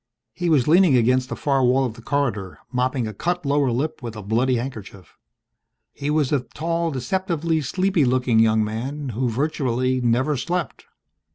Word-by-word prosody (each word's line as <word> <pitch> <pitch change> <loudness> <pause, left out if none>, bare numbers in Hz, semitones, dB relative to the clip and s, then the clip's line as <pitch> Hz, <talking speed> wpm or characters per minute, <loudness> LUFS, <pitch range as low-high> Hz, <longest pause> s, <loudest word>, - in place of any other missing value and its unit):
He 175 -1 -2
was 145 -6 +3
leaning 165 -4 +5
against 125 +2 +2
the - - -3
far 135 -2 +1
wall 130 +2 +3
of 120 - -3
the 115 - -13
corridor, 115 -9 -2
mopping 125 0 0
a 110 - -6
cut 175 - -2
lower 140 -2 +2
lip 140 +7 -2
with 115 -2 -6
a 105 - -7
bloody 120 +6 +1
handkerchief. 110 - -7 0.8
He 145 - -4
was 150 -3 +1
a 145 - +3
tall, 165 +6 -2
deceptively 165 - -1
sleepy 185 +4 +1
looking 125 -2 +2
young 110 -1 +4
man 130 +7 -4
who 120 +2 -1
virtually 130 -1 0
never 125 +5 +1
slept. 175 +8 -3
130 Hz, 170 wpm, -22 LUFS, 120-150 Hz, 0.8 s, leaning